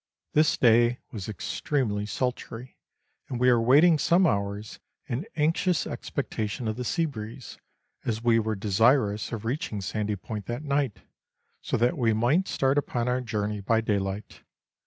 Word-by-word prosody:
This 155 Hz, 0 st, +3 dB
day 120 Hz, 0 st, +4 dB
was 105 Hz, -2 st, -6 dB
extremely 105 Hz, -, -2 dB
sultry, 125 Hz, 0 st, -4 dB, 0.5 s
and 125 Hz, -, -3 dB
we 125 Hz, 0 st, +5 dB
were 120 Hz, -1 st, +4 dB
wait 130 Hz, +7 st, +6 dB
ing 170 Hz, -3 st, +5 dB
some 170 Hz, +5 st, +4 dB
hours 100 Hz, -, -2 dB, 0.3 s
in 135 Hz, -, -4 dB
anxious 165 Hz, +2 st, +1 dB
expectation 110 Hz, +2 st, -4 dB
of 110 Hz, -, -1 dB
the 125 Hz, -, -4 dB
sea 165 Hz, +7 st, 0 dB
breeze, 115 Hz, -3 st, -8 dB, 0.4 s
as 115 Hz, -1 st, -2 dB
we 115 Hz, -1 st, +4 dB
were 110 Hz, 0 st, -1 dB
desirous 105 Hz, +2 st, +2 dB
of 115 Hz, -1 st, -5 dB
reaching 115 Hz, -4 st, -2 dB
Sandy 105 Hz, +2 st, -2 dB
Point 105 Hz, +1 st, -7 dB
that 120 Hz, +5 st, -4 dB
night, 140 Hz, -6 st, -1 dB, 0.6 s
so -, -, -1 dB
that 125 Hz, +7 st, +1 dB
we 115 Hz, -3 st, +3 dB
might 125 Hz, -, +2 dB
start 135 Hz, +2 st, +2 dB
upon 120 Hz, -4 st, -2 dB
our 125 Hz, +1 st, +1 dB
journey 105 Hz, -3 st, -2 dB
by 110 Hz, +3 st, +2 dB
daylight. 100 Hz, -2 st, -3 dB
115 Hz, 155 wpm, -27 LUFS, 105-135 Hz, 0.6 s, wait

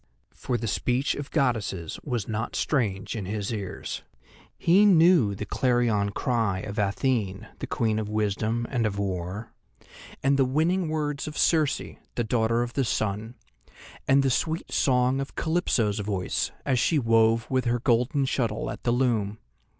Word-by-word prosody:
For 125 Hz, -, -2 dB
the 115 Hz, -, -4 dB
speech 125 Hz, +6 st, 0 dB
of 145 Hz, 0 st, -6 dB
goddesses 110 Hz, -, -1 dB
was 120 Hz, -8 st, -2 dB
not 110 Hz, +1 st, -3 dB
strange 110 Hz, -10 st, -1 dB
in 105 Hz, -4 st, -4 dB
his 105 Hz, +2 st, -3 dB
ears; 100 Hz, -4 st, -5 dB, 0.6 s
he 185 Hz, +5 st, +4 dB
knew 170 Hz, -, +5 dB
the 105 Hz, -, -5 dB
clarion 120 Hz, -3 st, +1 dB
cry 105 Hz, -4 st, 0 dB
of 105 Hz, +1 st, -5 dB
Athene, 105 Hz, 0 st, 0 dB
the -, -, -4 dB
Queen 110 Hz, -2 st, 0 dB
of 105 Hz, -1 st, -4 dB
Wisdom 110 Hz, +2 st, -1 dB
and 120 Hz, -4 st, +1 dB
of 100 Hz, -2 st, -4 dB
War; 95 Hz, +2 st, -4 dB, 0.7 s
and 135 Hz, +1 st, +3 dB
the -, -, +6 dB
winning 160 Hz, +6 st, +1 dB
words 150 Hz, -2 st, -2 dB
of 150 Hz, -, -6 dB
Circe, 155 Hz, -4 st, +3 dB, 0.4 s
the 120 Hz, -, 0 dB
Daughter 115 Hz, +1 st, +1 dB
of 120 Hz, 0 st, -6 dB
the 135 Hz, -, +1 dB
Sun, 110 Hz, 0 st, -2 dB, 0.7 s
and 135 Hz, +1 st, +5 dB
the 135 Hz, -, +2 dB
sweet 160 Hz, +6 st, -1 dB
song 125 Hz, 0 st, +2 dB
of 135 Hz, -, -7 dB
Calypso's 125 Hz, -, 0 dB
voice 100 Hz, -3 st, -1 dB, 0.2 s
as 130 Hz, -3 st, +2 dB
she 160 Hz, -, +2 dB
wove 115 Hz, -2 st, +3 dB
with 130 Hz, 0 st, +1 dB
her 120 Hz, 0 st, +2 dB
golden 125 Hz, +3 st, +2 dB
shuttle 130 Hz, -3 st, -1 dB
at -, -, -8 dB
the 120 Hz, -, 0 dB
loom. 115 Hz, -5 st, +1 dB
120 Hz, 160 wpm, -26 LUFS, 105-135 Hz, 0.7 s, the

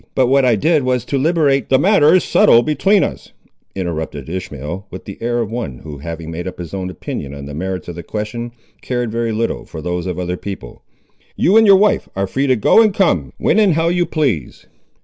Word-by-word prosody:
"But 130 Hz, -, +3 dB
what 135 Hz, +1 st, +3 dB
I 120 Hz, -2 st, +4 dB
did 155 Hz, +8 st, +2 dB
was 125 Hz, -2 st, -1 dB
to 140 Hz, -, -1 dB
liberate—" 145 Hz, -3 st, +1 dB
"The 130 Hz, -, +5 dB
matter 180 Hz, -2 st, +4 dB
is 185 Hz, -, +3 dB
settled 120 Hz, +1 st, +4 dB
between 190 Hz, +7 st, +3 dB
us," -, -, -5 dB, 0.4 s
interrupted 80 Hz, -5 st, -4 dB
Ishmael, 90 Hz, +1 st, -6 dB
with 95 Hz, -, -9 dB
the 100 Hz, -, -9 dB
air 120 Hz, +1 st, -1 dB
of 110 Hz, -2 st, -4 dB
one 115 Hz, -, -4 dB
who, 75 Hz, -3 st, -8 dB
having 80 Hz, +1 st, -7 dB
made 85 Hz, +3 st, -5 dB
up 90 Hz, -, -7 dB
his 85 Hz, -1 st, -8 dB
own 95 Hz, -1 st, -3 dB
opinion 70 Hz, -5 st, -6 dB
on 70 Hz, 0 st, -8 dB
the 75 Hz, -, -8 dB
merits 90 Hz, +4 st, -4 dB
of 85 Hz, -, -5 dB
the 85 Hz, -, -7 dB
question, 110 Hz, +6 st, -5 dB, 0.3 s
cared 120 Hz, -3 st, -2 dB
very 115 Hz, 0 st, -1 dB
little 115 Hz, +1 st, -2 dB
for -, -, -9 dB
those 90 Hz, +3 st, -3 dB
of 90 Hz, -2 st, -3 dB
other 90 Hz, 0 st, -3 dB
people; 95 Hz, -13 st, -8 dB, 0.5 s
"you 190 Hz, -, +2 dB
and 220 Hz, -1 st, +6 dB
your 200 Hz, -, +8 dB
wife 205 Hz, +1 st, +2 dB
are 95 Hz, 0 st, 0 dB
free 135 Hz, +8 st, -1 dB
to 130 Hz, -, +4 dB
go 120 Hz, -, +5 dB
and 215 Hz, -3 st, +2 dB
come, 85 Hz, -, +1 dB
when -, -, +2 dB
and 205 Hz, -5 st, +4 dB
how 165 Hz, +1 st, +2 dB
you 175 Hz, 0 st, +1 dB
please. 125 Hz, -, -2 dB
110 Hz, 225 wpm, -18 LUFS, 85-140 Hz, 0.5 s, your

